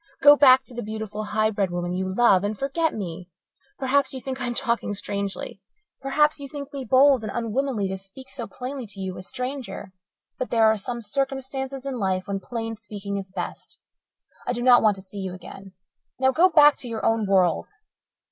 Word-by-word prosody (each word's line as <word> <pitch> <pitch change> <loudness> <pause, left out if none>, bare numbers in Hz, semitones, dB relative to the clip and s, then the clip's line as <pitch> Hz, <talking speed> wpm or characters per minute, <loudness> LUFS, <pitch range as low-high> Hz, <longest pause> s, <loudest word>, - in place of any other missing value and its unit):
Go 290 0 +9
back 265 -2 +7
to 260 - -13
the 240 - -4
beautiful, 215 -1 -5
high 215 +1 +1
bred 200 -3 0
woman 175 0 -3
you 185 +1 -2
love 195 -3 +4
and 205 +1 -2
forget 310 +6 0
me. 180 -3 -6 0.5
Perhaps 270 0 +1
you - - -4
think 265 +1 -5
I 245 - -1
am 240 - -3
talking 235 -4 -1
strangely. 200 0 -4 0.4
Perhaps 300 +3 +2
you 280 -1 -8
think 285 0 -8
me 275 -1 -4
bold 260 0 +5
and 215 - -4
unwomanly 235 -1 -1
to 190 - -3
speak 195 +8 -11
so 265 -4 -6
plainly 255 +3 -6
to 200 -1 -11
you, 190 -1 -4
a - - -7
stranger. 250 -2 -5 0.5
But 255 - -2
there 225 -1 +4
are 220 0 +5
some 235 +3 -5
circumstances 270 +2 -3
in 265 -3 -3
life 185 -2 -1
when 200 -1 -2
plain 225 +1 -5
speaking 205 -2 -6
is 195 -1 -6
best. 185 - -7 0.7
I - - +1
do 240 0 -3
not 245 -1 +7
want 215 -2 +4
to 190 - -10
see 200 +1 -9
you 190 -2 -4
again. 195 +1 -11 0.4
Now, 265 0 +3
go 345 +7 +5
back 295 -4 +6
to 250 - -5
your 225 -1 -3
own 225 -2 +2
world." 185 -4 +2
225 Hz, 205 wpm, -24 LUFS, 200-265 Hz, 0.7 s, Go